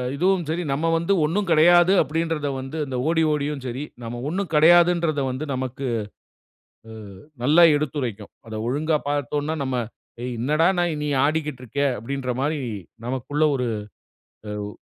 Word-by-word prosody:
இதுவும் 180 +3 +1
சரி 170 +3 -1
நம்ம 150 +4 -1
வந்து 170 +4 +1
ஒண்ணும் 190 +6 -1
கெடையாது. 175 +3 +6
அப்டின்றத 160 0 -2
வந்து 135 +4 -6
அந்த 130 -2 -4
ஓடி 165 -1 +2
ஓடியும் 145 -2 -2
சரி, 130 +3 -4 0.2
நம்ம 120 +1 -5
ஒண்ணும் 185 0 -3
கெடையாதுன்றத 170 -1 +5
வந்து 135 +5 -5
நமக்கு, 130 +1 -4 1.0
அ - - -9 0.5
நல்லா 155 +6 +6
எடுத்துரைக்கும். 130 -8 -3 0.2
அத 110 - -7
ஒழுங்கா 150 +5 +1
பார்த்தோன்ன்னா, 145 +2 -1
நம்ம 130 -1 -2 0.5
ஏய்! 125 0 -3
என்னடா 150 +6 +2
நா 175 - +3 0.2
நீ - - -2 0.2
ஆடிக்கிட்டு 150 -3 -2
இருக்க? 125 +4 -3 0.2
அப்டின்ற 130 +3 -4
மாரி 150 +2 0 0.5
நமக்குள்ள 130 +4 -1
ஒரு 125 -2 -1 0.9
எவ் 105 0 -5
150 Hz, 140 wpm, -23 LUFS, 130-165 Hz, 1.0 s, கெடையாது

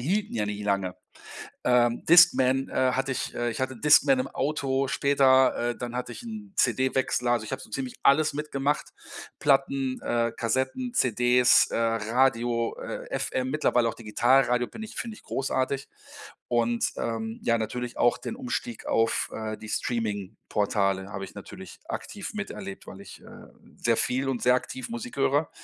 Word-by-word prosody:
hielten 200 - -1
ja 105 - 0
nie 105 0 -4
lange. 100 -3 -1 0.7
Äh, 125 -1 +5 0.2
Discman, 135 -6 +6
äh, 130 0 +1
hatte 135 +1 -1
ich - - -4
äh, 120 0 -1
ich 115 - -5
hatte 130 -1 -2
Discman 160 - +5
im 255 - -1
Auto 135 -3 -1
später, 135 -2 +4 0.2
äh, - - -9
dann 120 -1 -5
hatte 125 - -4
ich - - -9
'n 215 -3 -8
CD-Wechsler. 130 -1 +1
Also 115 -2 +1
ich - - -5
habe - - -5
so - - -12
ziemlich 125 +3 -4
alles 150 +2 +4
mitgemacht. 145 -1 -2 0.5
Platten, 135 -2 +1
äh, 115 -1 0
Kassetten, 130 - -1
CDs, 125 - +4
äh, - - -1
Radio, 115 +1 +1
äh, - - -6
FM, 130 0 -2
mittlerweile 125 -5 +2
auch 115 - -2
Digitalradio 125 +2 +2
bin 220 - -9
ich 220 - -9
finde 230 -2 -5
ich - - -17
großartig 135 0 -2 0.6
und, 120 0 +1
ähm, 115 -1 -3
ja 115 0 +2
natürlich 120 +2 -4
auch 120 - +3
den 230 - -6
Umstieg 250 -2 -4
auf, 115 0 +1
äh, 110 -1 -4
die 110 - -10
Streamingportale 100 -3 -1
habe 95 0 -5
ich - - -15
natürlich - - -10
aktiv - - -6
miterlebt, 100 - -7
weil - - -10
ich, - - -12
äh, - - -13 0.3
sehr 115 -1 +1
viel 130 +2 0
und 130 -3 -2
sehr 125 +1 +4
aktiv 130 0 -5
Musik 120 +1 -6
höre, 145 +2 +2
125 Hz, 165 wpm, -27 LUFS, 115-135 Hz, 0.7 s, Discman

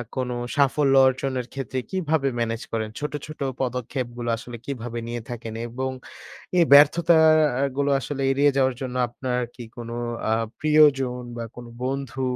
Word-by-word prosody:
কোন 130 -2 -2 0.3
সাফল্য 140 0 +3
অর্জনের 130 -1 -1
ক্ষেত্রে 130 -1 -3
কীভাবে 160 -6 0
ম্যানেজ 115 0 -1
করেন? 110 -1 -2
ছোট, 150 0 -3 0.2
ছোট 155 - -10 0.2
পদক্ষেপগুলো 125 -1 -3
আসলে 120 +1 -9
কীভাবে 120 -3 -5
নিয়ে 120 0 -4
থাকেন? 115 -2 -6
এবং 130 +3 -3 0.7
এই 175 - +7
ব্যর্থতাগুলো 150 -3 +5
আসলে 135 +2 -4
এড়িয়ে 140 +2 +3
যাওয়ার 130 -1 +2
জন্য 130 -1 -4
আপনার 125 +1 -3 0.2
কি 120 - -8
কোন 120 -2 -7 0.4
আ - - +2 0.3
প্রিয়জন 145 -5 +4 0.2
বা 115 - -3
কোন 125 - -9 0.2
বন্ধু 135 -1 -3
130 Hz, 140 wpm, -24 LUFS, 120-145 Hz, 0.7 s, এই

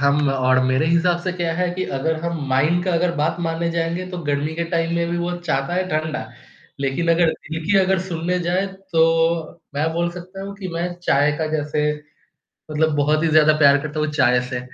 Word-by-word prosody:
हम 140 0 +3
और 130 -1 +2
मेरे 130 +4 +2
हिसाब 170 +1 +2
से 185 -1 -2
क्या 170 -2 -2
है 180 +1 0
कि 185 0 -2
अगर 160 +3 0
हम 170 -1 -3
माइंड 155 +7 +2
का 185 - 0
अगर 170 +1 +1
बात 150 +2 0
मानने 170 0 -1
जाएँगे 170 +2 -2
तो 180 - -5
गर्मी 145 +2 -1
के 170 +1 -2
टाइम 165 0 0
में 170 0 0
भी 175 - -1
वो 175 +1 -2
चाहता 155 -1 -1
है 185 0 0
ठंडा। 155 -1 -2 0.5
लेकिन 140 +5 -1
अगर 165 -1 +4
दिल 160 0 -6
की 195 +3 +3
अगर 190 0 +2
सुनने 180 0 -2
जाएँ, 180 +3 0
तो 165 -4 0
मैं 155 +3 0
बोल 170 +1 0
सकता 185 +2 -9
हूँ 200 0 -7
कि 195 -2 -6
मैं 175 +1 -2
चाय 145 -2 +3
का 160 - 0
जैसे, 150 0 0 0.8
मतलब 155 0 +1
बहुत 150 +2 +2
ही - - +3
ज़्यादा 155 0 +5
प्यार 145 -1 +6
करता 155 0 -4
हूँ 155 - 0
चाय 125 -4 +3
से। 125 -1 -3
165 Hz, 210 wpm, -21 LUFS, 150-175 Hz, 0.8 s, प्यार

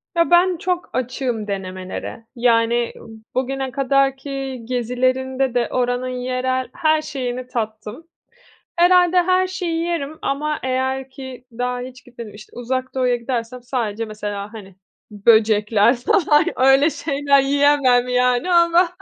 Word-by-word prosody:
Ya, 335 +1 +2
ben 355 0 +4
çok 360 -1 -2
açığım 245 -3 -2
denemelere, 185 +3 -6
yani, 235 0 +2 0.4
bugüne 265 0 -2
kadar 275 0 +1
ki 270 -2 -5
gezilerimde 255 +2 -1
de 240 -1 +1
oranın 245 0 -1
yerel 255 +1 -2
her 315 -3 +2
şeyini 255 -4 -5
tattım. 220 +3 -5 0.7
Herhâlde 355 0 +4
her 370 +1 +2
şeyi 350 -3 -3
yerim 315 -3 -3
ama 300 +2 -1
eğer 260 +1 -2
ki, 260 -2 -10
daha 245 +1 -3
hiç 255 +1 -10
gitmedim, 235 -4 -10
işte, 210 - -13
Uzak 255 +2 -3
Doğu'ya 250 -2 +1
gidersem 240 0 -4
sadece 230 -4 -3
mesela, 210 -1 -6
hani, 195 -4 -11 0.3
böcekler 215 +1 +3
falan, 310 - +3
öyle 270 +4 +5
şeyler 280 -1 +1
yiyemem 275 -3 +3
yani, 250 +6 +1
ama 340 +1 +4
255 Hz, 125 wpm, -20 LUFS, 235-285 Hz, 0.7 s, öyle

